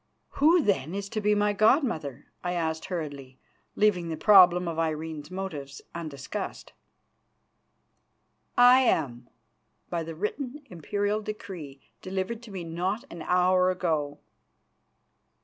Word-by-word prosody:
"Who, 320 +3 +4
then, 175 - 0
is 200 0 -4
to 215 - -3
be 210 0 +3
my 205 0 +2
god 220 +9 +4
mother?" 145 - -4 0.2
I 180 - -1
asked 160 -2 -2
hurriedly, 145 -7 -6 0.4
leaving 180 -5 +2
the 160 - -3
problem 180 -3 +6
of 165 -1 -3
Irene's 160 -1 -3
motives 165 -7 -6
undiscussed. 165 +4 -6 1.8
"I 245 +1 +8
am, 130 - 0 0.6
by 170 - -1
the 165 0 -6
written 255 - -4
Imperial 205 +5 -1
decree 185 -10 -8
delivered 190 +4 -3
to 235 -3 -12
me 185 -3 -5
not 180 +7 -2
an 170 - -8
hour 180 +1 +3
ago." 155 -6 -1
180 Hz, 125 wpm, -27 LUFS, 160-210 Hz, 1.8 s, I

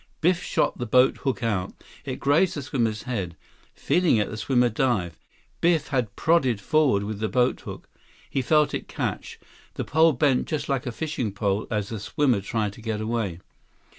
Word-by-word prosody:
Biff 180 +1 +2
shot - - 0
the 120 - -3
boathook 130 +2 +2
out. 100 -5 -1 0.3
It - - -4
grazed 155 +6 +3
the 145 - -4
swimmer's 115 -6 -1
head. 95 -9 -4 0.4
Feeling 175 -8 +2
it, 105 - 0
the - - -5
swimmer 125 +2 +2
dived. 105 -8 -1 0.4
Biff 165 -3 +2 0.2
prodded 135 -10 +2
forward 130 -2 +2
with 105 0 -4
the 110 0 -1
boathook. 125 +5 -1 0.4
He 135 - -1
felt 150 +4 +3
it - - -4
catch. - - -4 0.4
The - - -3
pole 160 +1 +4
bent 130 0 +2
just 150 -2 -2
like 135 -2 -1
a - - -1
fishing 135 -5 -3
pole 100 0 -1
as 105 -3 -2
the 110 - -4
swimmer 120 +1 +1
tried 105 0 -2
to 115 - -13
get 110 -1 -3
away. 110 -6 -2
120 Hz, 170 wpm, -25 LUFS, 105-145 Hz, 0.4 s, pole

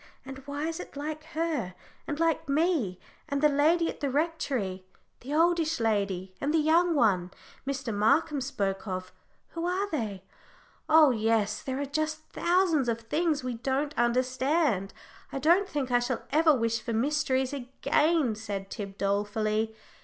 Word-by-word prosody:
and 270 0 -8
why 285 +2 -3
is 330 +1 -4
it - - -9
like 305 +1 -4
her, 315 - -2 0.3
and 295 - -3
like 330 -4 +1
me? 280 - +1 0.3
And 280 -1 0
the 300 - +5
lady 320 +4 +3
at - - -5
the 285 - -1
Rectory 270 - -1 0.4
the 265 - -9
oldish 325 0 +2
lady, 200 -4 -1
and 285 - 0
the 325 - +3
young 330 +2 +3
one 190 -9 +2 0.4
Mr. 270 -4 -2
Markham 280 +8 +2
spoke 200 -6 -2
of 185 -1 -4 0.4
who 335 - -5
are 375 +3 0
they? 210 - -3 0.7
Oh 310 -3 +7
yes, 220 -2 +1
there 265 0 -3
are 285 - -1
just 310 +2 -2
thousands 340 -7 +2
of 230 0 -1
things 300 +4 0
we 255 -1 -2
don't 270 +5 -2
understand. 255 - +1 0.4
I - - -3
don't 345 +8 +3
think 275 -6 -2
I 245 - +5
shall 245 0 -2
ever 315 +2 +5
wish 230 -2 0
for 230 +1 -4
mysteries 265 +1 +1
again," 280 +1 +1
said 205 -3 -6
Tib, 195 -3 -6
dolefully. 215 +2 0
270 Hz, 160 wpm, -28 LUFS, 220-310 Hz, 0.7 s, Oh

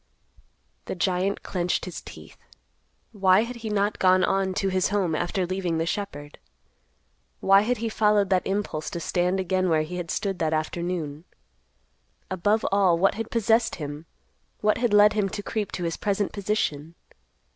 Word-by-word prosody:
The - - -4
giant 185 +2 0
clenched 180 -1 -1
his 180 -3 -7
teeth. - - -12 0.8
Why 195 -2 +4
had 240 +1 -6
he 225 -2 -6
not 205 0 0
gone 185 0 +4
on 190 0 +1
to 195 - 0
his 185 -1 +1
home 195 -5 0
after 175 +4 -1
leaving 180 -2 -2
the 165 - 0
shepherd? 160 -6 -5 1.0
Why 195 +1 +5
had 240 +4 0
he 230 - -3
followed 210 -3 +2
that 185 -1 +2
impulse 195 -6 -2
to 170 - -5
stand 180 +3 0
again 185 0 0
where 155 -2 +2
he 180 +3 -6
had 175 -2 -5
stood 195 0 -2
that 160 -1 0
afternoon? 160 -1 -3 1.1
Above 205 +4 +1
all, 190 -4 +4
what 195 +3 +3
had 225 +1 -5
possessed 230 0 +2
him—what 160 +8 -5
had 240 -2 +1
led 210 +1 +6
him 205 -2 0
to 205 +1 -6
creep 210 -2 -3
to 180 - -3
his 165 -1 -2
present 200 -1 -1
position? 170 -7 -2
190 Hz, 165 wpm, -25 LUFS, 175-205 Hz, 1.1 s, led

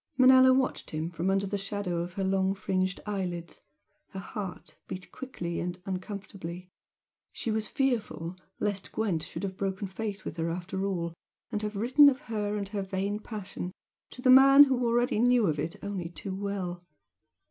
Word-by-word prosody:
Manella 260 0 +8
watched 260 0 +1
him 155 +2 -3
from 175 +2 -1
under 195 +1 +2
the 200 +1 -2
shadow 195 -3 -2
of 175 +1 -4
her 195 - -2
long 190 0 +1
fringed 185 -1 -1
eyelids 180 -5 -4 0.5
her 190 - -7
heart 195 -1 -7
beat 185 0 -7
quickly 175 -10 -5
and 180 +1 -3
uncomfortably. 185 -2 -6 0.6
She 225 - -3
was 215 0 -1
fearful 225 - -1 0.2
lest 205 -2 -2
Gwent 195 -8 0
should - - -6
have 190 -1 -4
broken 195 0 -2
faith 205 +1 -5
with 155 - -5
her 165 0 -1
after 185 +3 -3
all, 170 -4 -2 0.4
and 210 -2 -1
have 210 0 -3
written 255 +8 +7
of 270 0 -3
her 210 -6 -2
and 200 -1 -3
her 205 -1 -2
vain 195 +2 -2
passion, 205 -4 -6 0.4
to 250 - -11
the 255 - +6
man 275 +2 +10
who 260 -3 +1
already 240 0 +2
knew 245 -1 +4
of 155 -5 0
it 160 +3 -2
only 195 -4 -3
too 190 +2 -6
well. 190 -3 -3
195 Hz, 175 wpm, -29 LUFS, 180-220 Hz, 0.6 s, man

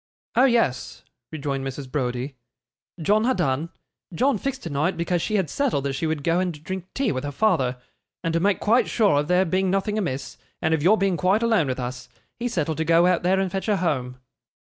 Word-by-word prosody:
'Oh 250 - +6
yes,' 230 - 0 0.3
rejoined 140 -3 -3
Mrs. 135 0 -5
Browdie. 130 -1 -2 0.6
'John 210 +7 +2
ha' 260 +1 +2
done. 140 +4 0 0.5
John 270 +8 +2
fixed 275 -1 -4
tonight, 160 +3 -1
because 170 +1 0
she 215 - -1
had 190 -5 +1
settled 255 - 0
that 140 -1 -1
she 145 +4 -2
would 155 -2 -2
go 170 +3 +2
and 175 -5 -3
drink 185 0 -5
tea 270 -3 +1
with 130 -2 -3
her 145 - -3
father. 135 - +1 0.5
And 165 - -1
to 165 - +2
make 200 +3 +2
quite 235 +4 +2
sure 205 -11 +3
of 145 - -2
there 180 +2 +3
being 185 +2 +1
nothing 200 +3 0
amiss, 135 -9 -4 0.2
and 160 - +1
of 160 - +1
your 195 +8 +5
being 195 -3 +1
quite 195 +6 +2
alone 225 -10 +3
with 130 0 -2
us, 125 0 -5 0.3
he 240 - -1
settled 160 -8 -1
to - - +2
go 165 +2 +4
out 180 -1 +3
there 185 +2 +2
and 190 -2 -1
fetch 195 +2 -3
her 210 - +3
home. 130 -8 -1
170 Hz, 215 wpm, -24 LUFS, 140-200 Hz, 0.6 s, Oh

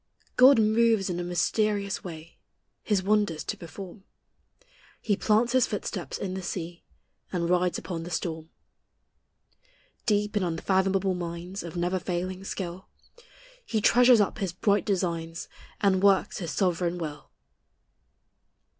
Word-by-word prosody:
God 260 +1 +8
moves 220 -2 +3
in 175 - -3
a - - -2
mysterious 200 +3 0
way 165 -2 -9 0.4
His 200 -3 0
wonders 205 -5 +1
to - - -3
perform; 185 +4 -10 1.0
He 205 - 0
plants 220 +4 +2
His 255 -2 +4
footsteps 205 - -4
in 185 -2 -4
the 190 - -4
sea, 175 -1 -5 0.5
And 170 -2 -1
rides 180 0 +2
upon 170 -3 -5
the 170 - -7
storm. 160 -2 -4 1.6
Deep 210 0 +1
in 205 - +2
unfathomable 190 +2 +1
mines 175 +2 -5
Of 170 +1 -7
never 175 +2 0
failing 185 +1 -3
skill, 185 -1 -5 0.8
He 225 - -1
treasures 245 +1 +6
up 200 - -1
His 190 -4 -2
bright 205 +2 +1
designs, 170 -4 -2 0.3
And 195 -2 +3
works 200 +1 +3
His 170 -4 -4
sovereign 175 +2 0
will. 150 -4 -6
185 Hz, 130 wpm, -27 LUFS, 175-205 Hz, 1.6 s, God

